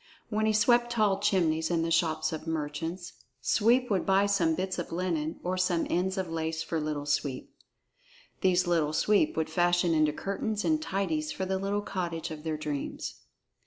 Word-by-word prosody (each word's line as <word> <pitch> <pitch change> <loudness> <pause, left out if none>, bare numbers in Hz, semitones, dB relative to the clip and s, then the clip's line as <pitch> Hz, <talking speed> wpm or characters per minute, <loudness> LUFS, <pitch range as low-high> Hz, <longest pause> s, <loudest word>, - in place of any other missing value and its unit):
When 215 0 +1
he - - +4
swept 240 +3 +3
tall 210 -4 +2
chimneys 170 -6 +1
in 170 -2 +1
the 165 - -1
shops 165 -1 +1
of 160 +1 -6
merchants, 160 +3 -4 0.3
Sweep 235 - +2
would 190 -3 +2
buy 195 +1 +3
some 175 -5 +2
bits 185 0 -2
of 175 - -5
linen 165 -3 -2
or 185 +1 -1
some 180 -2 +1
ends 190 +3 0
of 190 -1 -1
lace 160 0 -2
for 165 - -2
Little 150 -1 -3
Sweep. 145 -2 -2 0.9
These 185 -1 +3
Little 165 -3 +1
Sweep 200 -2 +2
would 160 - +1
fashion 175 +1 +2
into 155 -1 +3
curtains 205 +5 -3
and 310 -1 +2
tidies 165 - -1
for 190 - -3
the 190 0 -1
little 200 +1 -1
cottage 170 -4 -3
of 155 -1 -7
their 160 -1 -2
dreams. 150 -2 -4
175 Hz, 180 wpm, -29 LUFS, 160-195 Hz, 0.9 s, he